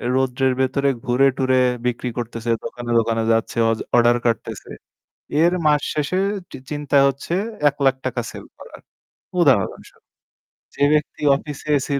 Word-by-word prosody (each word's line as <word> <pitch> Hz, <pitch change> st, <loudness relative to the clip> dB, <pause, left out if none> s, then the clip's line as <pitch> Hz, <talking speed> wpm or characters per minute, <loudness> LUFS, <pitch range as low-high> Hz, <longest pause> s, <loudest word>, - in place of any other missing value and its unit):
রোদ্রের 130 Hz, 0 st, +1 dB
ভেতরে 140 Hz, +1 st, +1 dB, 0.2 s
ঘুরে 130 Hz, +3 st, +3 dB
টুরে 130 Hz, -1 st, +2 dB, 0.3 s
বিক্রি 125 Hz, 0 st, -1 dB
করতেছে, 115 Hz, 0 st, -3 dB
দোকানে, 120 Hz, -1 st, -6 dB
দোকানে 115 Hz, 0 st, 0 dB
যাচ্ছে, 115 Hz, +1 st, 0 dB
অজ 110 Hz, -, -2 dB, 0.2 s
order 120 Hz, 0 st, +5 dB
কাটতেছে, 115 Hz, -1 st, -2 dB, 0.7 s
এর 175 Hz, +1 st, +4 dB
মাস 150 Hz, -1 st, +4 dB
শেষে 150 Hz, +5 st, -1 dB, 0.3 s
চি -, -, -8 dB
চিন্তা 145 Hz, -1 st, -1 dB
হচ্ছে 140 Hz, +5 st, -4 dB, 0.3 s
৳১০০,০০০ 140 Hz, -2 st, +1 dB
টাকা 120 Hz, -1 st, -1 dB
sell -, -, -10 dB
করার -, -, -12 dB, 0.6 s
উদাহরণস্বরূপ। 130 Hz, -, 0 dB, 0.7 s
যে -, -, -3 dB
ব্যক্তি 150 Hz, 0 st, -2 dB
office 145 Hz, 0 st, -6 dB
AC 140 Hz, -, +1 dB
130 Hz, 135 wpm, -21 LUFS, 120-140 Hz, 0.7 s, order